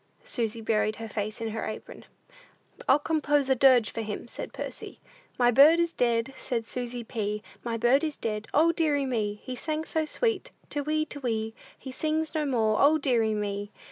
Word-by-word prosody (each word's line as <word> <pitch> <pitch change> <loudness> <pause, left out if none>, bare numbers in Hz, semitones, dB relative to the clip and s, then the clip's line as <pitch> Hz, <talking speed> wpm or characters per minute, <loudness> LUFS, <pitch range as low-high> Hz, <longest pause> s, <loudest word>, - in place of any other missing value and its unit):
Susy 230 -2 -2
buried 215 -1 +1
her 225 - -6
face 215 0 -4
in 225 - -2
her 220 0 -4
apron. 215 - -8 0.8
"I'll - - +7
compose 295 -2 +1
a 265 - +5
dirge 255 -3 +5
for 230 - -4
him," 215 +1 -5
said - - -6
Percy. - - -7 0.4
"My 245 -1 +4
bird 290 +7 +7
is 340 0 +1
dead, 235 +1 +1
said 230 -3 -2
Susy 245 0 -3
P., 210 -2 -3 0.2
My 230 -1 -2
bird 240 +6 +3
is 305 -2 -2
dead; 210 -1 -3
O, 320 +3 +4
deary 300 -4 +1
me! 210 -5 -1
He 255 - -5
sang 310 +4 -3
so 320 -1 -1
sweet, 465 +8 0 0.2
te 290 - -1
whee, 310 +2 0
te 295 -1 -6
whee; 225 -4 -2 0.2
He 265 - -8
sings 315 +4 -1
no 305 -2 0
more; 220 -5 +2
O, 300 +3 +6
deary 235 -7 +2
me! 205 -1 -3
245 Hz, 190 wpm, -28 LUFS, 220-295 Hz, 0.8 s, I'll